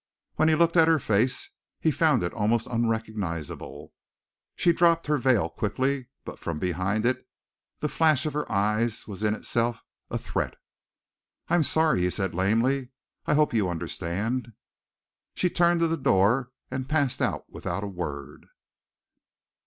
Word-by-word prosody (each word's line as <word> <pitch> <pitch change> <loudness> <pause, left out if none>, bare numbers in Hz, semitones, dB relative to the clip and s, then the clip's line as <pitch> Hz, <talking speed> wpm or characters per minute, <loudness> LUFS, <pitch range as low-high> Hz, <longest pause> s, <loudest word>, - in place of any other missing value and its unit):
When 155 - +2
he 155 - +4
looked 170 +2 +3
at 160 -1 +6
her 165 -1 +5
face, 115 0 0 0.3
he 160 - +2
found 150 - +2
it 85 - -2
almost 110 +1 +1
unrecognizable. 110 - -3 0.6
She 170 - +3
dropped 170 -1 +3
her 150 -1 +1
veil 120 -9 +3
quickly, 130 +8 -2 0.2
but - - -8
from 85 -2 -4
behind 90 +6 -1
it 130 +1 -1 0.5
the 150 - +1
flash 155 -1 +2
of 155 - -2
her 150 -4 -3
eyes 110 +2 0
was 105 -2 -8
in 105 0 +1
itself 115 +1 -1 0.3
a - - -2
threat. - - -3 0.9
"I - - -1
am 175 - +5
sorry," 160 - +3
he 90 - +2
said 95 0 -2
lamely. 115 +8 +1 0.4
"I - - +3
hope 150 -3 +3
you 105 -5 +2
understand." 90 +8 -3 0.8
She 180 - +1
turned 170 0 +3
to 165 - +4
the 165 0 -1
door, 120 +1 +2 0.2
and 130 0 -4
passed 145 -5 +1
out - - -1
without 100 - -4
a - - -3
word. 75 -7 -6
120 Hz, 155 wpm, -26 LUFS, 100-150 Hz, 0.9 s, at